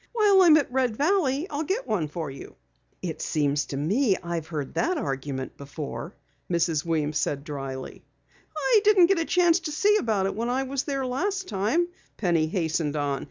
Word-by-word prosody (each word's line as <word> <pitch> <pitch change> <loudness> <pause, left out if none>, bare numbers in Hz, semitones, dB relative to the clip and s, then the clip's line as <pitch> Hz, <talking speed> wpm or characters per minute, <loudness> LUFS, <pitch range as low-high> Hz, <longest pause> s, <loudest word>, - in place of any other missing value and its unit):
"While 415 -4 +5
I'm 330 -4 +7
at 285 -5 0
Red 250 -3 +1
Valley 310 -2 +1
I'll 290 +1 -2
get 385 +10 -2
one 175 -8 0
for 150 -1 -5
you." 135 - -11 0.5
"It - - -4
seems 145 -1 0
to 135 - -5
me 195 - +2
I've 170 -3 -4
heard 150 -5 -5
that 360 +1 0
argument 135 - -4
before," 145 +5 -7 0.4
Mrs. 165 -3 +1
Weems 155 -3 0
said 145 -1 -1
dryly. 135 -3 -6 0.5
"I 460 -4 +4
didn't 410 -4 +6
get 375 0 +2
a 325 - 0
chance 350 0 +3
to 315 -3 -5
see 415 +7 +3
about 215 - 0
it 195 - -1
when 230 +3 -2
I 260 +2 0
was 270 0 -3
there 275 -2 -2
last 380 +9 -2
time," 235 - +1 0.3
Penny 170 -6 +1
hastened 160 -3 -1
on. 145 -2 -1
210 Hz, 185 wpm, -26 LUFS, -, 0.5 s, I'm